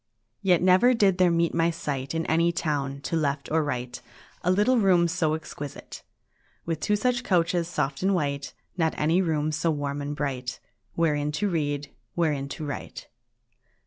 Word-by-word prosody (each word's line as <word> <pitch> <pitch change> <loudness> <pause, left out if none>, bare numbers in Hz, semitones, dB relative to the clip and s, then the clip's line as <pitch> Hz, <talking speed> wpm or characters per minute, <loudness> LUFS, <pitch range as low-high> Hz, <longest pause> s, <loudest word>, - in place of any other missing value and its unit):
III 195 - -1
Yet 175 -2 +5
never 185 +7 +5
did 195 -4 +3
there 180 -1 +5
meet 170 0 +1
my 165 0 +2
sight, 140 -3 -4
In 165 - -1
any 170 +1 +2
town, 145 -5 -2
to 165 - -3
left 145 -3 -1
or 160 0 +3
right, 125 -3 -4 0.4
A 180 - 0
little 210 +7 +3
room 180 -4 +4
so 165 -2 0
exquisite, 145 -3 -8 0.6
With 165 -2 -2
two 210 +6 +1
such 245 +3 0
couches 170 -3 +1
soft 140 -5 -2
and 195 +1 +2
white; 140 -4 -2 0.2
Not 160 -3 0
any 165 +5 +2
room 155 -3 0
so 160 +2 0
warm 145 -2 -2
and 145 +1 -4
bright, 130 -4 -3 0.4
Wherein 150 -3 +1
to 205 +7 0
read, 145 -5 -2 0.2
wherein 150 -5 0
to 155 +2 -5
write. 145 - -7
160 Hz, 175 wpm, -26 LUFS, 145-175 Hz, 0.6 s, Yet